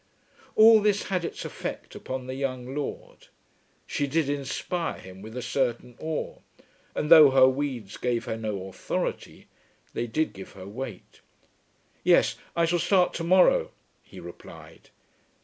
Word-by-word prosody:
All 220 0 +8
this 205 0 +1
had 185 -3 0
its - - -5
effect - - -6
upon 130 -1 -6
the 130 - -5
young 130 -1 -4
lord. 145 0 -6 0.6
She 145 - -2
did 150 0 0
inspire 145 +5 -3
him 95 0 -12
with 110 +4 -9
a 125 - -4
certain 120 -1 -2
awe; 160 0 -4 0.6
and 150 - -2
though 150 -3 +10
her 130 -1 +6
weeds 130 -6 -3
gave 120 -2 -1
her - - -3
no 105 -4 -4
authority, 95 - -4 0.5
they 120 - -2
did 155 0 -1
give 95 -1 -10
her 95 -1 -10
weight. 110 -2 -8 0.8
"Yes; - - +4 0.2
I 170 - +3
shall 175 +1 +1
start 185 0 +3
to 165 - -4
morrow," 330 - +4 0.3
he - - -13
replied. - - -12
135 Hz, 150 wpm, -26 LUFS, 120-165 Hz, 0.8 s, though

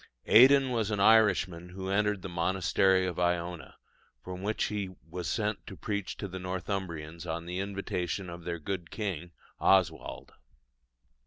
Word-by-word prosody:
Aidan 135 +2 +7
was 115 -4 0
an 105 -2 -1
Irishman 100 -5 +4
who 95 +1 -5
entered 105 -1 +1
the - - -4
monastery 95 +1 +2
of 90 -1 -3
Iona, 85 -1 -1 0.5
from 90 0 -7
which 105 +2 -1
he 100 -3 -3
was 85 0 -4
sent 105 -1 -2
to 95 - -8
preach 100 -3 -3
to 100 - -4
the 95 0 -7
Northumbrians 90 -3 -4
on 85 +1 -3
the 90 +2 -4
invitation 95 -2 -3
of 85 0 -8
their 85 0 -3
good 85 +1 -4
king, 95 -6 -4 0.3
Oswald. 90 -5 +1
95 Hz, 150 wpm, -30 LUFS, 85-100 Hz, 0.5 s, Aidan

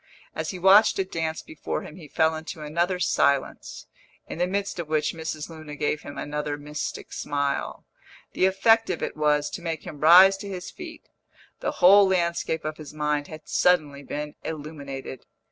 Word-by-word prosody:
As - - -4
he 185 - -5
watched 195 +4 +6
it 190 0 -2
dance 160 -1 -3
before 155 - -5
him 150 - -10
he 170 -4 -11
fell 160 +2 +2
into 155 0 -7
another 170 +4 -1
silence, 140 -5 0 0.4
in - - -8
the 180 - +2
midst 200 0 -3
of 170 - -4
which 155 -1 0
Mrs. 160 -2 -5
Luna 155 -3 -9
gave 145 0 -1
him 145 - -9
another 150 0 -3
mystic 150 +1 -6
smile. 145 -1 -2 0.5
The 185 - +3
effect 225 +4 +3
of 180 - -2
it - - -3
was 150 -1 +2
to - - -6
make 165 -3 -4
him 150 - -8
rise 185 +5 +8
to 200 +1 -8
his 180 -2 -6
feet; 340 -3 -10 0.5
the - - -2
whole 195 +2 +7
landscape 170 -3 0
of 155 0 -4
his 155 -1 -10
mind 150 -1 -1
had 155 -1 -11
suddenly 150 -6 +2
been 150 +1 -5
illuminated. 145 -4 -7
160 Hz, 180 wpm, -25 LUFS, 150-180 Hz, 0.5 s, rise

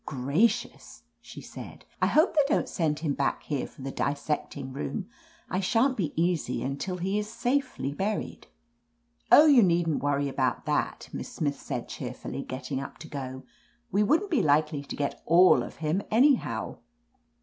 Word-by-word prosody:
"Gracious!" 140 - 0 0.2
she - - -11
said, - - -10 0.2
"I - - +4
hope 310 +4 +4
they 305 - +5
don't - - +2
send 155 -4 -1
him 150 -3 0
back 140 0 -1
here 145 -4 -2
for 130 - -13
the 135 - -4
dis 140 +1 -1
secting 140 -3 -3
room. 180 +7 -4 0.4
I 185 - -1
shan't 230 +7 +2
be 170 -10 -1
easy 170 -2 0
until 140 +7 -3
he 190 +4 -1
is 210 +1 -5
safely 245 - -1
buried." 205 +7 -3 0.8
"OK, 305 0 +9
you 250 - +7
needrft 170 -5 +2
won^^ 145 0 0
about 130 -2 -1 0.4
lEai^" - - -13
Miss - - -6
Smith 145 -2 -2
said 120 - -4
cheerfully, 125 +1 -6
getting 130 +1 -5
up 140 - -8
to 160 - -10
go. 130 -3 -6 0.5
"We 200 - +2
wouldn't 325 - +2
be 290 -9 +3
likely 150 -1 +2
to - - -7
get 140 -1 -3
all 175 +3 +6
of - - -7
him 160 +4 -1
anyhow." 260 +5 +2
155 Hz, 170 wpm, -28 LUFS, 140-210 Hz, 0.8 s, OK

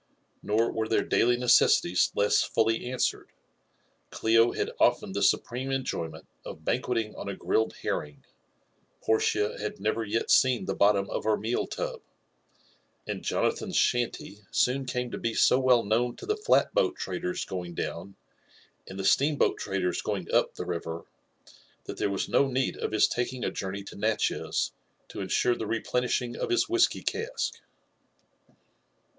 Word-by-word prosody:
Nor 110 +3 +1
were 110 0 -2
their 115 - +2
daily 120 0 +2
necessities 115 -7 +4
less 100 0 +3
fully 115 +1 0
answered: 130 - -1 0.8
Clio 115 +1 +3
had - - -2
often - - +2
the 100 +1 -2
supreme 125 +6 +1
enjoyment 85 -12 -3 0.2
of 80 - -10
banqueting 115 -3 -1
on - - -6
a 100 - -4
grilled 110 +3 0
herring; 75 -1 -3 0.8
Portia 105 -1 +1
had 105 -1 -4
never 110 +3 -1
yet 110 +2 -1
seen 130 -2 +4
ihe - - -1
bottom 100 -1 +3
of - - -2
her 110 -1 +2
meal 115 +3 -2
lub; - - -4 1.1
and - - -4
Jonathan's 190 -4 -1
shanty 120 -4 0
soon 130 +2 +1
came 125 -1 -3
to - - -5
be 115 -1 -2
so 125 - +4
well 125 -2 +4
known 120 +4 0
to - - -10
the 425 - 0
flat 425 - +2
boat 435 -8 +2
traders 180 - -3
going 90 -2 -6
down, 85 +5 -5 0.7
and 95 - -8
the 95 - -3
steam 145 +8 +3
boat - - +1
traders 95 -2 -1
going 95 -5 -3
up - - +2
the - - -5
river, 85 -1 -4 0.8
that - - -7
there - - 0
was 100 -1 -2
no 140 - +3
need 130 0 -1
of - - -3
his 110 - +4
taking 125 0 -3
a - - -1
journey 100 +1 -5
to - - -10
Natchez 110 +1 -1 0.4
to - - -6
ensure 125 - +1
the 110 - -5
replenishing 125 +2 -1
of - - -3
his 360 -1 +2
whisky 355 +2 +2
cask. 455 +2 -3
115 Hz, 160 wpm, -28 LUFS, 100-125 Hz, 1.1 s, necessities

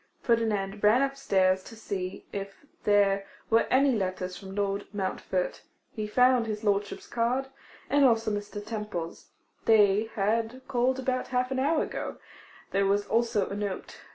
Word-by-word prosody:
Ferdinand 210 -4 0
ran 220 +6 +5
up 275 0 -1
stairs 190 -7 +2
to 225 - -11
see 195 -3 -5
if 200 +6 -6 0.2
there 200 -1 +4 0.3
were 225 +1 +4
any 275 +1 +4
letter 185 -4 -1
from 190 +1 -9
Lord 200 0 -1
Montfort. 190 -2 -2 0.3
He 215 -1 -3
found 250 +1 +4
his 215 0 -4
lordship's 205 -1 0
card, 250 +3 0 0.4
and 285 0 +3
also 225 -4 +3
Mr. 205 0 -5
Temple's; 210 -7 -5 0.4
they 210 -1 +5
had 225 +4 0
called 255 0 +1
about 255 -1 -1
half 250 0 0
an 260 - 0
hour 295 +4 +2
ago; - - -5 0.5
there 195 0 +2
was 205 +1 +2
also 230 -3 +1
a - - -5
note. 205 -2 -4
210 Hz, 155 wpm, -28 LUFS, 195-245 Hz, 0.5 s, ran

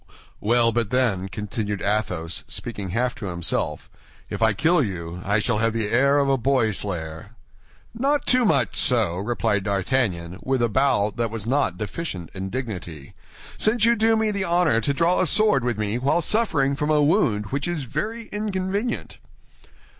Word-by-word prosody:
"Well, 115 +2 +3
but 115 -2 -1
then," 105 -7 0
continued 105 0 -4
Athos, 90 -6 -1
speaking 105 -5 -5
half 120 +6 0
to 100 - -7
himself, 85 -2 -2 0.4
"if - - -4
I 110 -1 +4
kill 160 - +3
you, 90 -6 -4
I 105 +1 +1
shall 110 0 0
have 115 0 +1
the 110 -2 -2
air 140 +4 +4
of 140 -1 +2
a 135 -1 +2
boy 130 -3 +2
slayer." 90 0 -4 0.6
"Not 275 +5 0
too 255 0 +4
much 140 - +2
so," 110 -9 +1
replied 105 0 -1
D'Artagnan, 95 -3 -1
with 130 -2 0
a 120 - +2
bow 110 -3 +2
that 115 -1 0
was 110 -1 -6
not 120 - 0
deficient 105 - -5
in 95 0 -5
dignity, 90 - -6 0.5
"since 220 +1 +3
you 235 0 +4
do 225 0 +3
me 220 -1 +1
the 200 -2 -1
honor 170 -9 +3
to 130 - 0
draw 165 +5 +2
a 185 - +3
sword 210 - +3
with 120 -3 -1
me 105 +2 -1
while 140 +7 +1
suffering 150 -12 +1
from 150 +2 -2
a 150 -1 +3
wound 130 - +1
which 140 +3 -1
is 170 -5 -2
very 225 - -4
inconvenient." 205 +2 -3
120 Hz, 175 wpm, -23 LUFS, 100-155 Hz, 0.6 s, I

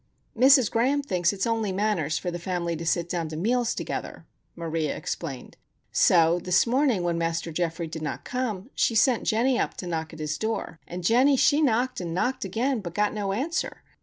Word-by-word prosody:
"Mrs. 260 -1 +6
Graham 265 +5 +1
thinks 180 -8 +1
it's 195 -1 -2
only 225 -3 0
manners 185 -6 0
for 180 - -3
the 175 - -5
family 170 -1 -2
to 165 +1 -5
sit 170 +1 +1
down 170 -2 -2
to 155 - -7
meals 235 +8 0
together," - - -5 0.3
Maria 165 -3 -2
explained. 140 -7 -6 0.3
"So 170 0 +4
this 180 +1 +2
morning 245 -5 +2
when 170 -1 0
Master 165 0 -2
Geoffrey 165 +1 -2
did 160 0 -7
not 155 - -4
come, 250 -3 -3
she 230 - +1
sent 240 +2 +3
Jennie 240 +3 +2
up - - -2
to - - -6
knock 160 -2 -3
at 160 - -11
his 155 0 -3
door, 220 -7 -3
and 180 +1 -6
Jennie, 255 +8 +4
she 290 +4 +4
knocked, 250 -4 +1
and 170 -1 -4
knocked 250 +8 0
again, 230 +6 -1
and 175 -2 -6
got 210 0 +1
no 205 -2 -2
answer. 275 +12 -2
190 Hz, 195 wpm, -26 LUFS, 170-240 Hz, 0.3 s, Mrs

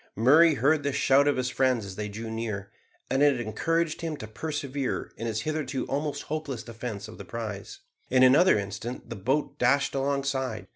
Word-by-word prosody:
Murray 150 +8 +6
heard 145 +5 +3
the 140 0 -1
shout 140 +1 +4
of 145 - +2
his 125 0 -1
friends 130 -5 +1
as 95 -1 -8
they 105 +1 -3
drew 110 +2 -6
near, 110 -3 -4 0.4
and 135 - +2
it 145 -3 +4
encouraged 165 +8 -1
him 160 -2 -3
to 110 - -7
persevere 140 +2 -3
in 115 - -4
his 110 -1 -2
hitherto 155 -4 -2
almost 145 +1 -2
hopeless 150 -7 -4
defence 110 -3 -6
of 110 - -12
the - - -6
prize. 110 -4 -6 0.3
In 130 0 +4
another 135 +4 +6
instant 105 +6 -5
the - - -3
boat 135 +7 -1
dashed 140 +1 +2
alongside. 135 -5 -1
130 Hz, 185 wpm, -27 LUFS, 110-145 Hz, 0.4 s, Murray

